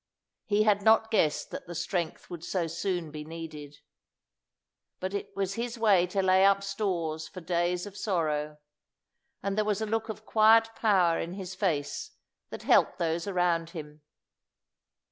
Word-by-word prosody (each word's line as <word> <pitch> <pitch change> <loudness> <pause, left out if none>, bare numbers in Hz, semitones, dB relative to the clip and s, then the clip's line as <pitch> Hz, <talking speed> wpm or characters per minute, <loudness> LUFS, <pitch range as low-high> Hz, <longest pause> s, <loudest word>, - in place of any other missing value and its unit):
He 210 0 +2
had 210 -1 +3
not 220 +1 +4
guessed 155 -9 +1
that - - -7
the 175 - -7
strength 170 -1 -3
would 170 -2 -8
so 180 -1 -1
soon 170 0 -3
be 150 0 -6
needed. 155 -2 -9 1.2
But 190 +1 -4
it 200 - -3
was 195 -1 -1
his 235 +2 -4
way 200 -6 +4
to 195 +2 -1
lay 190 0 +5
up 200 0 +4
stores 175 -6 -2
for 185 - -9
days 175 +1 -1
of 205 -1 -10
sorrow, 155 -7 -1 0.9
and 200 0 -1
there 215 - +2
was 210 -1 0
a 220 - -1
look 225 +1 -2
of 215 0 -7
quiet 225 +1 +5
power 185 -6 +3
in 170 - -4
his 190 -1 -6
face 160 -8 -2 0.4
that - - -8
helped - - +4
those 165 +2 -1
around 175 -3 +1
him. 150 -1 -9
185 Hz, 165 wpm, -29 LUFS, 165-205 Hz, 1.2 s, lay